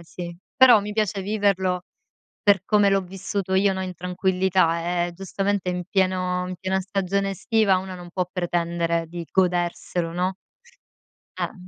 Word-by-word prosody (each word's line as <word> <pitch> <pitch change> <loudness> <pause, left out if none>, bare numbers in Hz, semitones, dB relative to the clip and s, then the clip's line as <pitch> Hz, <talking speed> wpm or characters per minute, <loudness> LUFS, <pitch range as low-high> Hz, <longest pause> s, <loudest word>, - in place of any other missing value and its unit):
sì. 170 0 -8 0.2
Però 255 -4 +8
mi 210 +1 -5
piace 205 -2 -1
viverlo 190 -3 +1 0.6
per 200 -3 +4
come 205 -1 +4
l'ho 195 0 +3
vissuto 190 +1 -4
io, 195 +1 +3
no, 190 - -3
in 185 -1 -5
tranquillità, 180 -1 +1
eh, - - -6
giustamente 195 +1 -2
in 180 0 -2
pieno 185 -1 +1
in 185 - -5
piena 190 +2 -1
stagione 195 0 -1
estiva 210 +1 +2
uno 190 0 -5
non 175 -1 -10
può 180 +1 -1
pretendere 170 -1 -1
di 170 0 -7
goderselo, 175 -2 0
no? 185 +2 -1 1.0
Eh! - - -2
185 Hz, 150 wpm, -24 LUFS, 175-195 Hz, 1.0 s, Però